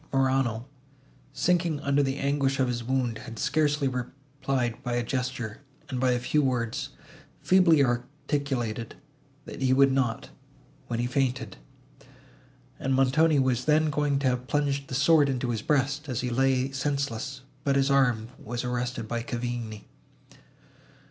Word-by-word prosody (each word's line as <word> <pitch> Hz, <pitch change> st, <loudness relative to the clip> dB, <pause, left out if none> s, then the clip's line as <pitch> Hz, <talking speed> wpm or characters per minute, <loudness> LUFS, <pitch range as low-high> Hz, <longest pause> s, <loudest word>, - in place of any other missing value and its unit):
Morano, 130 Hz, -4 st, +1 dB, 0.7 s
sinking 170 Hz, -4 st, +1 dB
under 140 Hz, 0 st, +2 dB
the 135 Hz, 0 st, -1 dB
anguish 140 Hz, -1 st, 0 dB
of 130 Hz, -, +3 dB
his 120 Hz, -1 st, -2 dB
wound, 125 Hz, -3 st, -1 dB
had 115 Hz, +1 st, -9 dB
scarcely 145 Hz, +1 st, +1 dB
replied 130 Hz, -1 st, -3 dB
by 120 Hz, -, -3 dB
a 120 Hz, 0 st, 0 dB
gesture, 125 Hz, -3 st, -3 dB, 0.3 s
and 130 Hz, -, -3 dB
by 130 Hz, 0 st, +2 dB
a 125 Hz, -, +2 dB
few 140 Hz, +5 st, +1 dB
words, 130 Hz, +1 st, -1 dB, 0.5 s
feebly 170 Hz, -6 st, +5 dB
articulated, 120 Hz, -2 st, -2 dB, 0.5 s
that -, -, -9 dB
he 130 Hz, -1 st, +3 dB
would 135 Hz, 0 st, +5 dB
not—when 120 Hz, -2 st, -4 dB
he 120 Hz, -, 0 dB
fainted; 125 Hz, -4 st, -1 dB, 1.2 s
and 135 Hz, 0 st, 0 dB
Montoni 145 Hz, +4 st, +4 dB
was 130 Hz, -2 st, +1 dB
then 155 Hz, 0 st, +3 dB
going 145 Hz, -1 st, +1 dB
to 135 Hz, -1 st, 0 dB
have 125 Hz, 0 st, -2 dB
plunged 140 Hz, -1 st, 0 dB
the 130 Hz, -, -4 dB
sword 145 Hz, +1 st, +4 dB
into 125 Hz, -2 st, -1 dB
his 110 Hz, -2 st, -2 dB
breast, 145 Hz, +2 st, 0 dB
as 125 Hz, -, -1 dB
he 125 Hz, -1 st, -2 dB
lay 130 Hz, +1 st, +2 dB
senseless, 135 Hz, -1 st, -2 dB, 0.2 s
but 140 Hz, -1 st, +1 dB
his 135 Hz, 0 st, +2 dB
arm 125 Hz, -5 st, +2 dB
was 120 Hz, +3 st, -4 dB
arrested 125 Hz, -2 st, -3 dB
by 120 Hz, +1 st, -2 dB
Cavigni. 120 Hz, -2 st, -4 dB
130 Hz, 145 wpm, -27 LUFS, 120-140 Hz, 1.2 s, feebly